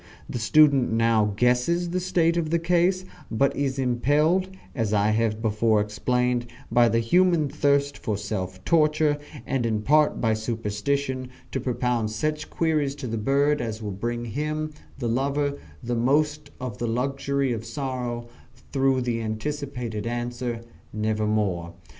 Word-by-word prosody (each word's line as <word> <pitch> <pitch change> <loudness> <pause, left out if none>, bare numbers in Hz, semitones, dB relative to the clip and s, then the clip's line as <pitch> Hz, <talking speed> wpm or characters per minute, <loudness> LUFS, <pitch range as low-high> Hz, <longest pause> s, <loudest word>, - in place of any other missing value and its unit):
The 120 - -4
student 140 +2 +5
now 115 -2 +3
guesses 125 +9 +2
the 185 - 0
state 175 -2 +2
of 165 -2 0
the 170 - +2
case, 180 +2 +2 0.2
but 135 +5 +1
is 135 -1 -1
impelled, 145 +9 +2 0.2
as 110 -4 -1
I 105 +1 +3
have 110 0 0
before 110 0 +2
explained, 120 +4 0 0.2
by 120 -1 +5
the 115 - +2
human 170 +6 +3
thirst 140 0 +1
for 105 -4 -2
self 95 -3 -4
torture, 155 -2 +3 0.3
and 135 -2 -1
in 110 -2 0
part 150 +4 +3
by 115 -2 +2
superstition, 120 +4 -2 0.2
to 135 - -1
propound 125 -3 0
such 150 +8 -2
queries 150 -4 0
to 140 - -7
the 115 -2 -2
bird 140 +5 +2
as 110 -2 -4
will 105 - -3
bring 120 +5 -3
him, 155 +5 -2 0.3
the 125 -3 -2
lover, 140 +4 0 0.2
the 120 +1 -2
most 150 +4 +1
of 125 -5 -5
the 120 - -1
luxury 135 +2 0
of 110 -1 -4
sorrow, 120 -1 -4 0.4
through 135 -1 +2
the 120 -2 -1
anticipated 120 -1 -4
answer, 120 0 -3 0.3
"Nevermore." 105 -5 -1
125 Hz, 145 wpm, -25 LUFS, 115-145 Hz, 0.4 s, student